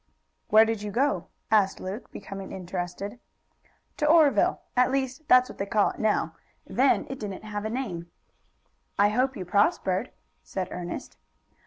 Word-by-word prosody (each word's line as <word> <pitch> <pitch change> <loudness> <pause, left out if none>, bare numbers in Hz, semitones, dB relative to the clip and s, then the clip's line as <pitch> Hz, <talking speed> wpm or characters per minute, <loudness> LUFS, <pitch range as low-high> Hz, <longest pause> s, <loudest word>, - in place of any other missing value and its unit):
"Where 220 +1 +7
did 225 -2 -2
you 210 - -4
go?" 225 -5 0 0.2
asked 200 -3 +3
Luke, 195 +6 -6
becoming 195 -1 -8
interested. 185 +4 -5 0.8
"To 300 - +1
Oreville. 310 -2 +4
At 250 +1 +4
least, 270 +2 -2
that's 255 -2 +6
what - - -11
they 195 - -2
call 210 0 +2
it - - -13
now. 215 -1 +1 0.3
Then 265 +2 +2
it 270 - -6
didn't 200 -2 -6
have 210 -1 -5
a - - -1
name." 185 -9 -4 0.9
"I 205 +1 +5
hope 255 +4 +1
you 185 - -5
prospered," 190 0 +1 0.3
said 185 -1 -4
Ernest. 180 +8 -6
210 Hz, 155 wpm, -27 LUFS, 190-255 Hz, 0.9 s, Where